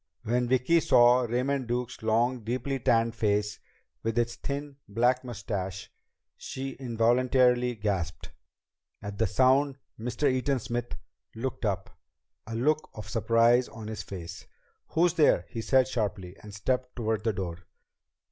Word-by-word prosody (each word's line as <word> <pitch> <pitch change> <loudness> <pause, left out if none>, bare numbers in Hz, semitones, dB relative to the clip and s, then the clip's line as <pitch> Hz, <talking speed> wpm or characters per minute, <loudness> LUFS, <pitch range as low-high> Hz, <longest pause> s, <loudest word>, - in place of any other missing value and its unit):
When 120 +2 0
Vicki 130 +7 +3
saw 120 -4 +5
Raymond 130 +2 0
Duke's 120 +1 -3
long, 115 +3 +1
deeply 130 +4 -2
tanned 115 -1 +2
face 105 -2 0 0.4
with 115 +1 -2
its 120 0 +1
thin 140 0 -5
black 125 +5 +2
mustache, 100 -5 -5 0.4
she 135 +1 -6
involuntary 125 +1 +2
gasped. 95 -7 -3 0.7
At 105 -1 -6
the 115 - +3
sound 135 +5 +3 0.2
Mr. 125 +6 -1
Eaton 130 +1 +1
Smith 120 0 -4 0.4
looked 125 +1 -4
up, 95 -3 -2 0.5
a 115 - -5
look 150 +6 +1
of 105 - -8
surprise 115 +2 +3
on 110 -1 -9
his 110 -2 -4
face. 90 -4 -8 0.4
"Who's 170 +1 +2
there?" 150 - +4
he 115 - -4
said 130 +2 +3
sharply, 100 -7 -3
and 105 - -10
stepped 125 +5 -2
toward 110 -2 -1
the 115 - +2
door. 90 -4 -4
120 Hz, 140 wpm, -28 LUFS, 110-130 Hz, 0.7 s, saw